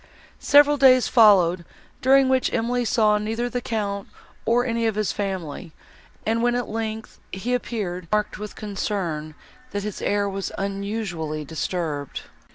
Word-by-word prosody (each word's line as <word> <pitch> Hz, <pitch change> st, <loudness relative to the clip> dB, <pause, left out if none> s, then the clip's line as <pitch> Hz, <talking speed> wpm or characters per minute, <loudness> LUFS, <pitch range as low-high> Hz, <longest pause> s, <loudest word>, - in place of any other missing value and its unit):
Several 290 Hz, 0 st, +5 dB
days 255 Hz, -3 st, +6 dB
followed, 185 Hz, -6 st, +5 dB, 0.4 s
during 270 Hz, +1 st, +5 dB
which 260 Hz, -1 st, +2 dB
Emily 245 Hz, +2 st, 0 dB
saw 215 Hz, -2 st, +3 dB
neither 225 Hz, +3 st, -2 dB
the 245 Hz, -, -2 dB
Count, 200 Hz, -4 st, -3 dB, 0.4 s
nor 240 Hz, +2 st, +3 dB
any 230 Hz, -2 st, 0 dB
of 220 Hz, -, -1 dB
his 215 Hz, -1 st, 0 dB
family; 185 Hz, -5 st, -4 dB, 0.5 s
and, 225 Hz, +1 st, +1 dB
when, 240 Hz, 0 st, +2 dB
at 245 Hz, -1 st, -2 dB
length, 220 Hz, 0 st, -5 dB
he 215 Hz, +7 st, -3 dB
appeared, 200 Hz, -8 st, -3 dB
she -, -, -23 dB
remarked, 210 Hz, 0 st, 0 dB
with 210 Hz, 0 st, -7 dB
concern, 190 Hz, -7 st, -3 dB, 0.3 s
that 205 Hz, -4 st, -4 dB
his 210 Hz, -1 st, -5 dB
air 205 Hz, 0 st, +1 dB
was 195 Hz, -1 st, -4 dB
unusually 195 Hz, -6 st, -3 dB
disturbed. 155 Hz, -2 st, -3 dB
210 Hz, 150 wpm, -23 LUFS, 190-235 Hz, 0.5 s, days